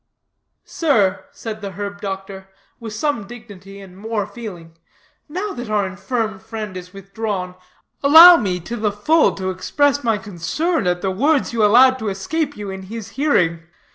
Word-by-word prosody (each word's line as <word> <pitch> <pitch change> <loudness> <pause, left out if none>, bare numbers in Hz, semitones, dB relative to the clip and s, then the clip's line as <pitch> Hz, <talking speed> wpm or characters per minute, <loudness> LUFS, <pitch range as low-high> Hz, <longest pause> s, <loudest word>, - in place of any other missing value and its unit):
"Sir," 210 - +1
said 220 -1 -7
the 200 -2 -6
herb 200 +1 -6
doctor, 195 -1 -6 0.3
with 230 -2 -7
some 230 -2 -2
dignity 200 -4 -12
and 190 -2 -13
more 215 +1 -3
feeling, 195 -7 -10 0.5
"now 385 +6 -4
that 245 -2 -7
our 210 -2 +1
infirm 215 +2 -3
friend 215 -2 -7
is 180 0 -8
withdrawn, 195 -1 -5 0.5
allow 325 +5 +10
me, 185 - -1
to 235 +8 -6
the 210 -1 0
full, 300 +11 +2
to 190 -1 -3
express 285 +10 0
my 225 -2 +1
concern 205 - -2
at 175 0 -1
the 190 - 0
words 275 +7 +1
you 225 -2 +1
allowed 255 +5 +6
to 220 - -2
escape 290 +10 -3
you 205 -2 -6
in 190 0 -7
his 225 -2 -7
hearing. 180 - +1
210 Hz, 165 wpm, -20 LUFS, 190-245 Hz, 0.5 s, allow